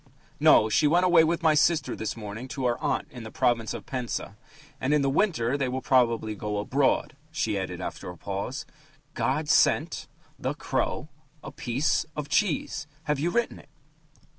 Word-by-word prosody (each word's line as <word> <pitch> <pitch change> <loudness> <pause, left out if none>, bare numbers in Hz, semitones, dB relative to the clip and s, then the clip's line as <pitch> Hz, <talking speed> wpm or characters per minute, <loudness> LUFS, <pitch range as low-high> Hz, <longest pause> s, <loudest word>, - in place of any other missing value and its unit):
"No, 110 - +6
she 130 +7 +3
went 175 +4 +4
away 175 -3 +6
with 165 +1 0
my 160 -1 +5
sister 160 +2 +2
this 110 - -4
morning 110 +3 -7
to 130 0 -4
our 120 -1 +1
aunt 150 -2 -1
in 125 -4 -9
the 110 - -7
province 120 -2 +1
of - - -6
Penza. 120 -5 -4 0.4
And 140 +3 +1
in 145 - +2
the 135 - +2
winter 140 - +1
they 130 -2 0
will 130 +1 -2
probably 115 -4 +2
go 105 0 -4
abroad," 135 +7 +1
she 135 -10 -1
added 95 -2 -3
after 90 - -6
a 90 - -9
pause. 100 - -4 0.5
"'God 155 0 -1
sent... 160 +1 +2 0.3
the - - -2
crow... - - -2 0.3
a - - -7
piece... 130 +6 0
of 150 -1 -5
cheese....' 160 -3 0 0.2
Have 150 -3 -1
you 165 +4 +1
written 235 +6 -1
it?" - - -18
135 Hz, 180 wpm, -27 LUFS, 115-155 Hz, 0.5 s, No